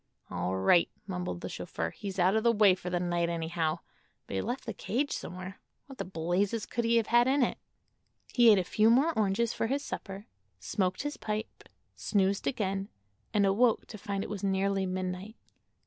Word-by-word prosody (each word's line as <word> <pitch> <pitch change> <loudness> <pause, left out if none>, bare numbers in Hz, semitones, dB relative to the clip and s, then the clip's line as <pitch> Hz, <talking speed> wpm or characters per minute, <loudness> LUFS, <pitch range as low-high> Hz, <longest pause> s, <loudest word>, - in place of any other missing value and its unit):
"All 90 +1 -1
right," 130 - +4 0.2
mumbled 180 - -4
the - - -4
chauffeur; 80 0 -4
"he's 195 -2 -7
out 185 +2 +3
of 220 - +3
the 235 +1 +4
way 210 -4 +5
for 180 -1 -5
the 180 0 0
night, 175 -1 0
anyhow. 165 -1 -1 0.4
But - - -8
he 95 - 0
left 250 +2 -4
the 230 - -4
cage 260 +8 -2
somewhere. 185 +2 -6 0.2
What 270 -2 -13
the - - -2
blazes 185 +5 -1
could 235 0 -2
he 230 +1 +3
have 230 - +2
had 240 +2 +4
in 270 0 +3
it?" - - -1 0.7
He 240 -2 +7
ate 210 - +7
a 185 - +2
few 215 +5 +3
more 275 +8 +4
oranges 215 +1 +1
for 225 - -1
his 280 +4 -1
supper, 195 +1 -6 0.3
smoked 185 - -1
his 290 0 -4
pipe, 215 +1 -5 0.3
snoozed 195 -1 0
again 195 -4 -1 0.4
and 205 -2 +3
awoke 220 +4 +3
to 215 - -9
find 200 0 -3
it - - -7
was 205 -2 -5
nearly 195 0 +1
midnight. 185 +3 -4
195 Hz, 195 wpm, -30 LUFS, 180-225 Hz, 0.7 s, He